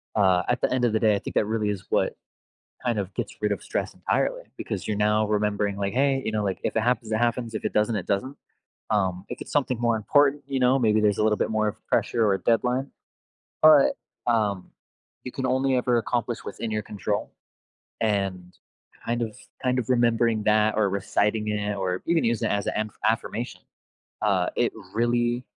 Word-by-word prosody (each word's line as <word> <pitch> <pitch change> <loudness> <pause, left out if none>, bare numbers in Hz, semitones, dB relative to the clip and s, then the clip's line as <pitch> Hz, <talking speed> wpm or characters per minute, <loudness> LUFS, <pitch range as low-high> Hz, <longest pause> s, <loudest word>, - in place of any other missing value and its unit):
uh, 95 -3 +4
at 120 - 0
the - - +1
end 130 -1 +2
of 115 - +1
the 110 - +1
day, 110 -2 +4
I - - -1
think - - -7
that - - +4
really 110 0 -1
is 100 -2 -4
what - - +1 0.7
kind 120 -3 0
of 100 -2 -3
gets - - -4
rid 105 0 0
of 100 - -2
stress - - -3
entirely - - -1
because - - -4
you're 105 - -1
now 105 0 +2
remembering, 105 -1 0
like, 100 +1 -2
"Hey," 135 0 +2
you - - -1
know, 105 -1 -1
like, 95 -2 -2
"If - - -2
it 110 - +2
happens, 120 -2 0
it 110 - +2
happens. 120 -1 0
If - - -4
it - - 0
doesn't, 105 +1 +1
it 90 - -5
doesn't." 115 +8 -1 0.5
Um, 95 -3 0
If - - -7
it's - - -8
something 130 -4 0
more 120 -1 +2
important, 140 +6 +3
you 135 -1 -1
know, 130 +2 +4
maybe 110 -3 +3
there's 105 -2 +2
a - - +3
little 110 -1 +3
bit - - -1
more 110 -1 +1
of 105 - -2
pressure 115 -2 +1
or 100 - +3
a 95 - -1
deadline. 125 +5 +1 0.7
But, 155 -3 +7 0.3
um 105 -5 0 0.5
You 125 - -6
can 130 -2 -2
only 130 +1 +1
ever 125 -1 +2
accomplish 120 0 -2
what's - - -8
in 115 - -2
your 110 0 -1
control. 105 0 -3 0.7
And 95 -4 -1 0.5
kind 120 +1 -1
of 110 -2 -4 0.3
kind 125 0 +1
of 110 - -7
remembering 115 -3 +2
that 110 0 +3
or 105 -2 +3
reciting 105 +2 0
it 105 -1 -1
or 95 -2 -2
even 170 -1 +2
use 115 -2 0
it - - +1
as 100 -1 -1
a - - -2
an-affirmation. 110 +2 -2 0.6
Uh, - - +2
it - - +1 0.2
really 120 +1 +1
110 Hz, 210 wpm, -25 LUFS, 105-120 Hz, 0.7 s, But